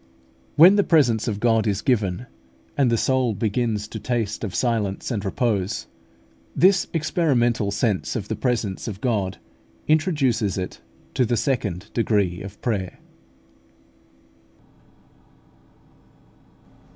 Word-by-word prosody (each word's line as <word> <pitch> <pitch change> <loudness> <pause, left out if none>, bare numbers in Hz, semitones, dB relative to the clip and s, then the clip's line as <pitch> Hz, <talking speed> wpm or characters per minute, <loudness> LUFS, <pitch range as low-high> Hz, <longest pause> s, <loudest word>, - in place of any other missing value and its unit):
When 180 +6 +8
the 205 - +4
presence 125 - +3
of 105 -3 -2
God 115 -1 +2
is 100 -2 -1
given, 110 -5 0 0.5
and 135 -4 +2
the 115 - +2
soul 130 -2 +1
begins 110 -1 -1
to - - -6
taste 115 -4 -2
of 100 - -4
silence 110 -3 -1
and 105 -4 -2
repose, 105 -2 -1 0.7
this 190 +2 +4
experimental 130 - +1
sense 100 -1 -1
of 105 -3 -3
the - - -2
presence 115 -7 -2
of 100 -3 -5
God 105 -6 -1 0.5
introduces 135 - +1
it 90 -1 -5 0.3
to 130 - +2
the 120 0 0
second 105 -5 -2
degree 100 -6 +1
of 100 0 -9
prayer. 100 -6 -2
115 Hz, 115 wpm, -23 LUFS, 100-125 Hz, 0.7 s, When